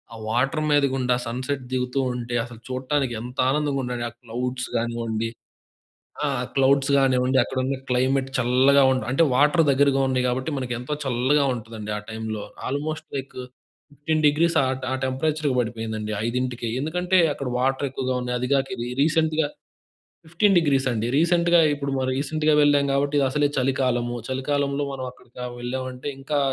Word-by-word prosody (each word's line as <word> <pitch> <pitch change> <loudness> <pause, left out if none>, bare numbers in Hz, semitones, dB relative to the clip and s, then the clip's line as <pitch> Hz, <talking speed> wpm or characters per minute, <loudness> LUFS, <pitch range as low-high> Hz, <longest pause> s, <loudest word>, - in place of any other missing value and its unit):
ఆ - - -9
water 135 +7 +1
మీదగుండా 135 -3 +2
sunset 130 +3 -3
దిగుతూ 125 +1 -1 0.2
ఉంటే 120 0 -4
అసలు 120 -2 -12
చూడటానికి 130 -1 -1
ఎంత 125 +1 -8
ఆనందంగా 145 -2 0
ఉండండి. 120 -1 -3
ఆ - - -25
క్లౌడ్స్ 125 +2 -3
కానివ్వండి 115 -1 -2 1.0
ఆ! - - +1 0.3
క్లౌడ్స్ 135 +1 +3
కానివ్వండి 130 -1 +2
అక్కడున్న 130 +1 -2
క్లైమేట్ 130 +2 +1
చల్లగా 130 +3 +4
ఉంట 130 -4 0
అంటే 150 +5 +4
వాటర్ 150 +4 +4
దగ్గరగా 135 0 +3
ఉన్నాయి 130 -1 +1
కాబట్టి 130 +4 -2
మనకు 125 -2 -3
ఎంతో 125 +5 -4
చల్లగా 135 +3 +2
ఉంటుందండి 110 -2 -7
ఆ - - -3
టైమ్‌లో 110 -1 -4 0.2
ఆల్‌మోస్ట్ 155 +3 -3
లైక్ 135 0 -5 0.6
15 155 +2 -1
డిగ్రీస్ 160 +3 +3
ఆ - - +1
ట్ - - -13
ఆ - - 0
టెంపరేచర్‌కి 145 +2 0
పడిపోయిందండి 110 -2 -3
5కి 125 0 -2
ఎందుకంటే 180 +5 0 0.2
అక్కడ 140 - -5
వాటర్ 135 +2 +1
ఎక్కువగా 130 -1 -2
ఉన్నాయి. 125 0 -2
అది 125 - -2
కాక 135 -1 +2
ఇది 120 0 -4
రీసెంట్‌గా 160 -1 +2 0.8
15 190 +4 +2
డిగ్రీస్ 140 -5 +2
అండి. 115 0 -1
రీసెంట్‌గా 170 +1 +4
ఇప్పుడు 140 -1 -4
మనం 130 0 0
రీసెంట్‌గా 155 +2 +1
వెళ్ళాం 145 -1 +4
కాబట్టి 145 +1 +1
ఇదసలే 145 +2 +2
చలికాలం. 130 -2 +1 0.2
చలికాలంలో 140 +2 -1
మనం 130 -1 -5
అక్కడికి 125 -1 -20 0.2
వెళ్ళామంటే 130 +2 -4
ఇంకా 145 +1 -1
130 Hz, 150 wpm, -24 LUFS, 125-145 Hz, 1.0 s, చల్లగా